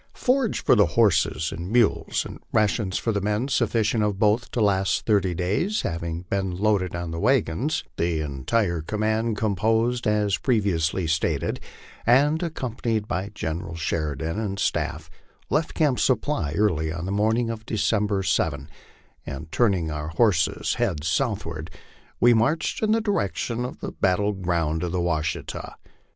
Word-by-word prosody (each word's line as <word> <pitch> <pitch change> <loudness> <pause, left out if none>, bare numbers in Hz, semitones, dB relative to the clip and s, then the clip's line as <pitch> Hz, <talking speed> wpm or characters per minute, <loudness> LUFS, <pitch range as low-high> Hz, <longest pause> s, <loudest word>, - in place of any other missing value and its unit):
FORAGE 255 -3 +1
for - - +5
the 105 -4 +5
horses 95 -7 +3
and 85 +2 -6
mules, 115 -1 +2
and - - -8
rations 105 -2 +1
for 115 - -1
the 100 -2 -1
men, 105 +5 0
sufficient 110 -4 +1
of 105 -2 0
both 110 +3 +2
to - - -3
last 95 -3 +2
thirty 100 -5 +2
days, 105 - 0
having 85 0 -3
been 95 0 -2
loaded 100 -3 +1
on 85 -1 -4
the 80 - -4
wagons, 130 - +1
the 85 -1 0
entire 80 - -1
command, 110 +4 -1
composed 110 +4 +1
as 105 -2 +1
previously 95 - +1
stilted, 80 0 0 0.4
and 145 +6 +4
accompanied 120 -9 -2
by 95 +2 -2
General 85 0 -4
Sheri 80 -3 -2
dan 80 +7 -3
and 100 -3 -3
staff, - - -1 0.4
left 155 +1 0
Camp 145 -6 +2
Supply 130 - 0
early 80 -5 +1
on 85 +1 -4
the 95 - -3
morning 110 +3 +1
of 110 -1 -7
December 105 -2 +1
7, - - 0 0.6
and 80 +4 -7
turning 95 -9 +1
our 75 0 -4
horses 85 0 +1
1 - - +3
heads 75 +1 -4
southward, 80 - -2 0.5
we 120 0 +6
marched 130 +9 +1
in 215 -1 +2
the 225 +1 +3
direction 120 - -1
of 125 - -6
the - - -4
battle 100 +2 +1
ground 85 -4 -1
of 90 -1 -2
the 90 - 0
Washita. 80 -2 -2
100 Hz, 155 wpm, -24 LUFS, 85-115 Hz, 0.6 s, we